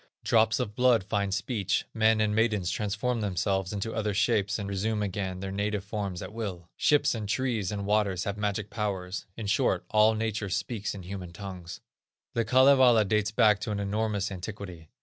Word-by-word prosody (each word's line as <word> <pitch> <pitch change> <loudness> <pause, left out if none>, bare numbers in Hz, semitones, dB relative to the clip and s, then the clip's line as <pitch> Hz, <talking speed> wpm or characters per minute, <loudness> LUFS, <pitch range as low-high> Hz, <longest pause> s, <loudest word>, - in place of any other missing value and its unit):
Drops 110 -1 +3
of 105 - -2
blood 125 -3 +3
find 100 0 -1
speech; 100 +1 -1
men 110 -1 +3
and 105 -1 +1
maidens 105 -5 +1
transform 110 +4 -1
themselves 95 -1 -1
into 105 +2 -3
other 105 -2 -1
shapes 105 -1 +1
and 100 -2 -4
resume 105 +2 -1
again 95 -2 -3
their 95 0 -4
native 100 0 -1
forms 100 -3 -4
at - - -8
will; 95 -7 -5
ships, 145 -1 +3
and 110 -3 -4
trees, 115 -6 0
and 100 -1 -3
waters, 100 -3 +1
have 100 - -3
magic 105 0 -2
powers; 100 -3 -3
in 110 - -5
short, 100 - +1
all 110 +1 +5
nature 110 -2 -2
speaks 105 +2 -3
in 95 - -8
human 90 -1 -7
tongues. 90 -1 -8 0.5
The 115 - +1
Kalevala 130 -2 +5
dates 105 0 +1
back 105 -1 +4
to - - -4
an 105 - -2
enormous 100 0 -1
antiquity. 90 -4 -7
105 Hz, 180 wpm, -28 LUFS, 95-110 Hz, 0.5 s, all